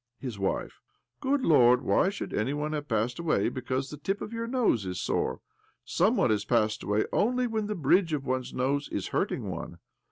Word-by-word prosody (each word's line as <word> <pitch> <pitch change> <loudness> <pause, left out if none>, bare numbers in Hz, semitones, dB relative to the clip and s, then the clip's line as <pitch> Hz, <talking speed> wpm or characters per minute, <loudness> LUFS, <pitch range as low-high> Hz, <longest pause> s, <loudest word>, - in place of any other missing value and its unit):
■His 120 -6 -5
wife: 95 - -2 0.4
Good 275 +1 +1
Lord! 125 -5 +5
Why 190 - +3
should 200 - -6
any 125 +7 0
one 150 +1 -2
have 150 -1 -3
passed 115 +5 -1
away 170 -2 +1
because 130 +1 -3
the 150 - -7
tip 195 +7 -2
of 230 - -6
your 230 0 -3
nose 235 - +2
is 90 -1 -4
sore? - - -1 0.4
Some - - +2
one - - +3
has 105 -1 +1
passed 110 -1 +1
away 105 +1 +1
only 250 +3 +2
when 220 -3 -1
the 210 - -2
bridge 170 +3 +3
of 145 -3 -2
one's 130 -1 -2
nose 140 +3 -1
is - - -3
hurting - - -1
one. - - -6
140 Hz, 200 wpm, -28 LUFS, 120-200 Hz, 0.4 s, Lord